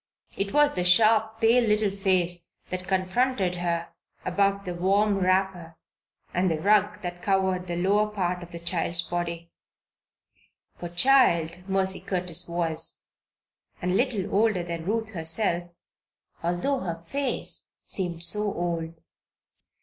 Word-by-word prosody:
It 195 0 -2
was 295 0 +4
the 180 - -1
sharp, 220 +4 +4
pale 235 +2 +5
little 210 -2 +1
face 180 -3 0 0.2
that 185 0 -3
confronted 190 +1 0
her 170 -1 -2 0.4
above 200 +2 +1
the 180 - -3
warm 195 +3 +2
wrapper 185 -3 0 0.6
and 180 +1 +1
the 160 -2 -1
rug 210 +2 +2
that 175 0 -5
covered 190 -2 0
the 175 - -3
lower 200 +4 +2
part 180 -3 -2
of 175 - -10
the 170 - -8
child's 170 0 0
body; 170 -1 -4 1.2
for 175 - -7
child 175 -5 +3
Mercy 190 0 0
Curtis 180 -2 -1
was, 170 -2 0 0.8
and 180 +1 -1
little 215 -5 0
older 205 -3 +2
than 170 -1 -5
Ruth 220 +1 -2
herself, 170 +1 +1 0.7
although 175 +11 0
her 170 -5 -5
face 280 -2 -3
seemed 175 -3 -2
so 210 +4 +1
old. 170 -2 -3
185 Hz, 130 wpm, -26 LUFS, 175-205 Hz, 1.2 s, pale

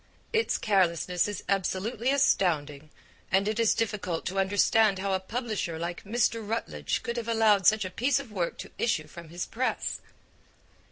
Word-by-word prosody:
Its 450 0 +2
carelessness 180 -3 +1
is 205 - -5
absolutely 200 +5 -1
astounding, 155 - +1 0.4
and 195 +2 +3
it 215 +1 -1
is 230 -2 +3
difficult 205 -7 -2
to 195 +1 -1
understand 205 +1 +3
how 195 +1 -1
a 190 - +1
publisher 215 -4 -3
like 170 +1 -5
Mr. 230 +1 +1
Routledge 225 +2 -3
could 235 +1 -3
have 235 -1 -3
allowed 220 -4 +4
such 215 -2 +4
a 185 - -5
piece 265 +8 +1
of 270 -6 -9
work 180 -5 -2
to - - -9
issue 160 -10 +1
from 170 +1 -12
his 175 +2 -4
press. 255 +3 -2
205 Hz, 165 wpm, -28 LUFS, 180-225 Hz, 0.4 s, allowed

